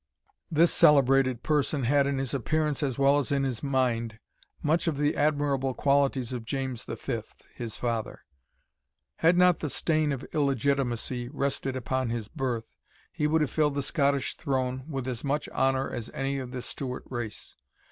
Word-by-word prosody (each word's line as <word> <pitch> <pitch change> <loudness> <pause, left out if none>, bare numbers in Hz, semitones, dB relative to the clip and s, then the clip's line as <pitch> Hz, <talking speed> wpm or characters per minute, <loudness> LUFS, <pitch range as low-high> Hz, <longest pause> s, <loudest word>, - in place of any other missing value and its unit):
This 165 +2 +4
celebrated 135 -3 +5
person 145 -2 +1
had 140 +3 +3
in 140 -1 0
his 135 -1 -2
appearance, 150 +2 0
as 135 -5 -1
well 140 +1 +4
as 140 - -3
in 140 -1 +2
his 130 -4 -2
mind, 120 -5 0 0.5
much 160 +3 +1
of 155 -4 0
the 145 +1 +1
admirable 145 -3 +1
qualities 140 -3 +1
of 120 -2 -4
James 130 0 -3
V. - - -3 0.3
his 115 -2 -5
father. 115 -2 -3 0.9
Had 170 +2 +4
not 180 -1 +5
the 150 - -3
stain 155 +1 +1
of 135 -1 -4
illegitimacy 135 -3 0
rested 135 -1 -2
upon 130 0 -1
his 115 -3 -3
birth, 125 -7 -3 0.4
he 150 - 0
would 160 +1 +2
have 150 - 0
filled 150 -2 +1
the 140 - -1
Scottish 140 -2 0
throne 130 -1 -2
with 135 -4 -3
as 125 -3 -4
much 145 +1 -1
honour 135 0 +1
as 120 -1 -5
any 135 +1 -1
of 130 -2 -6
the 125 -1 -5
Stewart 130 -2 -5
race. 120 -4 -6
135 Hz, 165 wpm, -28 LUFS, 125-145 Hz, 0.9 s, celebrated